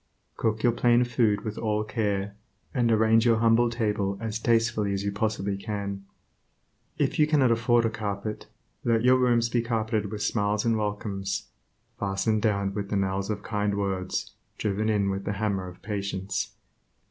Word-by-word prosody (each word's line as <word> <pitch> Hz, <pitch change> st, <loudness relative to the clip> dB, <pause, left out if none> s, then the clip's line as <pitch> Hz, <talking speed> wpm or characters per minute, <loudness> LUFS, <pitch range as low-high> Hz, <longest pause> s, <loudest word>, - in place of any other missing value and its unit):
Cook 110 Hz, 0 st, -1 dB
your 120 Hz, -, +5 dB
plain 120 Hz, +1 st, +3 dB
food 115 Hz, -4 st, +1 dB
with 110 Hz, -1 st, -5 dB
all 105 Hz, -1 st, 0 dB
care, 105 Hz, -3 st, -1 dB, 0.4 s
and 120 Hz, -3 st, +2 dB
arrange 110 Hz, 0 st, +4 dB
your 115 Hz, -2 st, +4 dB
humble 115 Hz, +1 st, +4 dB
table 105 Hz, -4 st, -1 dB
as 110 Hz, -1 st, -3 dB
tastefully 115 Hz, -3 st, +1 dB
as 100 Hz, 0 st, -2 dB
you 100 Hz, -, -1 dB
possibly 100 Hz, -1 st, -1 dB
can. 100 Hz, -1 st, -4 dB, 0.9 s
If -, -, 0 dB
you 150 Hz, -, +5 dB
cannot 140 Hz, -6 st, +4 dB
afford 120 Hz, 0 st, +3 dB
a 115 Hz, -, +1 dB
carpet, 105 Hz, -1 st, -4 dB, 0.4 s
let 115 Hz, -1 st, +2 dB
your 130 Hz, +1 st, +6 dB
rooms 120 Hz, -2 st, +3 dB
be 120 Hz, 0 st, +1 dB
carpeted 110 Hz, -3 st, -1 dB
with 105 Hz, -1 st, -3 dB
smiles 105 Hz, 0 st, 0 dB
and 115 Hz, -1 st, +3 dB
welcomes, 105 Hz, -2 st, -3 dB, 0.5 s
fastened 105 Hz, +2 st, 0 dB
down 100 Hz, -3 st, +1 dB
with 100 Hz, -1 st, -4 dB
the -, -, -1 dB
nails 95 Hz, +1 st, -1 dB
of 105 Hz, -1 st, -3 dB
kind 105 Hz, -2 st, -1 dB
words 95 Hz, -2 st, -2 dB, 0.3 s
driven 105 Hz, +1 st, -1 dB
in 100 Hz, -2 st, +2 dB
with 95 Hz, 0 st, -3 dB
the 100 Hz, -, -1 dB
hammer 100 Hz, -2 st, -1 dB
of 90 Hz, -, -12 dB
patience. 100 Hz, -2 st, -3 dB
105 Hz, 170 wpm, -27 LUFS, 100-115 Hz, 0.9 s, your